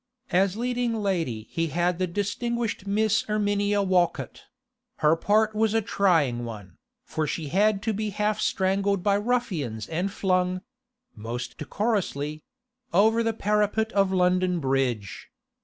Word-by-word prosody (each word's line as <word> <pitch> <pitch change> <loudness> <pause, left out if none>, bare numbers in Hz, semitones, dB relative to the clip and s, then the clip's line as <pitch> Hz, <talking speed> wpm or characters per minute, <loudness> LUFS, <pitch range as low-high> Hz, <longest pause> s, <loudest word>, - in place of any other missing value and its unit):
As 190 +2 +2
leading 245 -1 -1
lady 170 - -1
he 165 0 0
had 175 +2 0
the 185 - +1
distinguished 210 +3 -2
Miss 215 +2 +2
Erminia 205 -1 +1
Walcott; 185 -3 0 0.5
her 155 +1 +4
part 215 +5 +2
was 220 0 +1
a 225 - +3
trying 160 -13 +2
one, 105 -5 -8 0.3
for 155 -1 -2
she 155 -2 -3
had 200 +3 +2
to 220 0 0
be 215 +1 -2
half 210 +1 -1
strangled 195 0 +1
by 205 - +3
ruffians 195 - -2
and 175 +5 -2
flung—most 185 - -4
decorously—over 220 - -1
the 225 0 0
parapet 210 +1 +1
of 195 -1 +2
London 180 -1 +2
Bridge. 130 -7 -1
200 Hz, 125 wpm, -26 LUFS, 170-220 Hz, 0.5 s, her